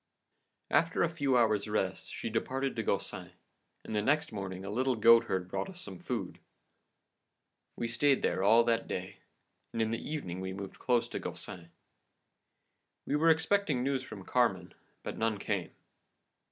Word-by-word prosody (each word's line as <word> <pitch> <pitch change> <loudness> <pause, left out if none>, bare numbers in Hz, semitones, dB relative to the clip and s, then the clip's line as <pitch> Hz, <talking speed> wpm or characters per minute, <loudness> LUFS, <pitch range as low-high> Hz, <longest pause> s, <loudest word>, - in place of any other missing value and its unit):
"After 165 +1 +3
a 170 - +2
few 140 -5 +2
hours' 110 -3 +3
rest, 95 -3 -1
she 115 - -5
departed 130 +4 -1
to 115 - -1
Gaucin, 100 -4 -2 0.5
and - - -5
the 105 - +2
next 150 +7 +1
morning 95 -2 -5
a 100 - -4
little 130 +3 +1
goatherd 110 -5 +5
brought 90 - -3
us 185 -2 -10
some 185 - -7
food. 120 - -4 1.4
We 115 - -1
stayed 135 +4 +2
there - - +1
all 115 +4 +6
that 115 -1 +1
day, 95 +1 -5 0.5
and 115 - -4
in 110 0 +1
the 115 - -2
evening 115 - -4
we 95 0 -4
moved 100 0 -7
close 120 -2 +2
to - - -4
Gaucin. 85 -2 -7 1.4
We - - 0
were 160 +3 +4
expecting 160 -4 +2
news 135 -1 0
from 105 -7 -9
Carmen, 95 -8 +1 0.3
but - - -5
none 110 -1 +1
came. 100 -3 -2
115 Hz, 160 wpm, -31 LUFS, 100-135 Hz, 1.4 s, all